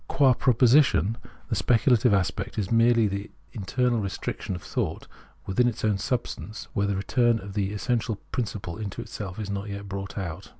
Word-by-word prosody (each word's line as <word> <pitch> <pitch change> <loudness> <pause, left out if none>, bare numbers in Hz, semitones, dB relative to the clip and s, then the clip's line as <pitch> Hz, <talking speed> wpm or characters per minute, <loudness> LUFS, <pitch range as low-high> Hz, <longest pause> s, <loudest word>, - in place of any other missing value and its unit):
Qua 135 -2 +4
proposi 125 +3 +5
tion, 115 -4 0 0.3
the - - 0
speculative 120 0 +3
aspect 95 -3 0
is 100 -1 -2
merely 115 -1 +5
the 100 +1 -4 0.2
internal 120 +2 0
restriction 95 -1 -3
of, 90 - -8
thought - - -3 0.4
within 120 +6 +2
its 115 -2 -2
own 105 -2 +2
substance 115 -3 -3
where 100 0 +1
the 100 - 0
return 120 +4 +2
of 100 0 -8
the 100 -1 -1
essential 115 +1 -1 0.2
principle 105 -6 -3
into 100 -3 -5
itself 95 -3 -7
is 105 -2 -4
not 100 +1 -4
yet 100 0 -6
brought 100 0 -6
out. 85 -5 -5
105 Hz, 175 wpm, -26 LUFS, 100-120 Hz, 0.4 s, proposi